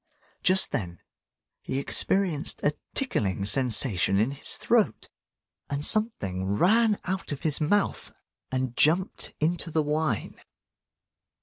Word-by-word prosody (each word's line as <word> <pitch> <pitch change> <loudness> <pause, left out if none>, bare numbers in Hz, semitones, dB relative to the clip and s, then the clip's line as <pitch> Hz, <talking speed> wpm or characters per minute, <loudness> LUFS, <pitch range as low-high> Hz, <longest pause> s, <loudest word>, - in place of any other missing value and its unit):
Just 185 0 +2
then 85 -5 -4 0.6
he 130 - -4
experienced 165 +2 +1
a 145 - +2 0.2
tickling 100 - -1
sensation 110 -5 +3
in 110 +6 +1
his 140 - 0
throat, - - 0 0.6
and 140 +1 0
something 100 - +1
ran 215 - +3
out 190 -1 -4
of 145 - -6
his 155 -1 0
mouth 200 +7 0 0.4
and 130 -2 -2
jumped 175 +5 +1
into 170 +2 -1
the 155 -1 0
wine. 150 -5 -2
145 Hz, 115 wpm, -26 LUFS, 115-185 Hz, 0.6 s, sensation